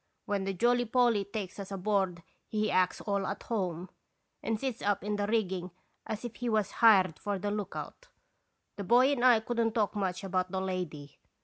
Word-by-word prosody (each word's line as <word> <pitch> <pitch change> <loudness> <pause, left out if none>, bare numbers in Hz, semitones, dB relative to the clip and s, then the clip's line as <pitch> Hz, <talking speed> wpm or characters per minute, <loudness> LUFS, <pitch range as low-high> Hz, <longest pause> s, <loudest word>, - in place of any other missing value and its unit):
When 200 -2 -1
the 195 - -1
Jolly 245 +5 +2
Polly 235 -3 +2
takes 200 -2 -6
us 195 - -6
aboard 190 -3 0 0.2
he 215 -1 0
acts 185 0 +2
all 200 -2 -1
at 200 - -4
home, 185 -5 -3 0.5
and 225 -1 -1
sits 255 -2 -3
up 205 -1 0
in 210 +1 -1
the 205 0 -1
rigging 190 -5 0 0.4
as 220 +2 -4
if 230 -3 -7
he 245 -1 -2
was 215 -3 +1
hired 195 -8 +5
for 205 -1 -2
the 205 +2 -2
lookout. 210 - -5 0.7
The 200 - -4
boy 245 +7 +5
and 260 -4 0
I 245 -3 +6
could 235 +1 -3
n't 225 0 0
talk 210 -3 +1
much 190 -2 -2
about 185 -1 -1
the 190 +1 -2
lady. 180 -6 -5
205 Hz, 195 wpm, -30 LUFS, 190-225 Hz, 0.7 s, I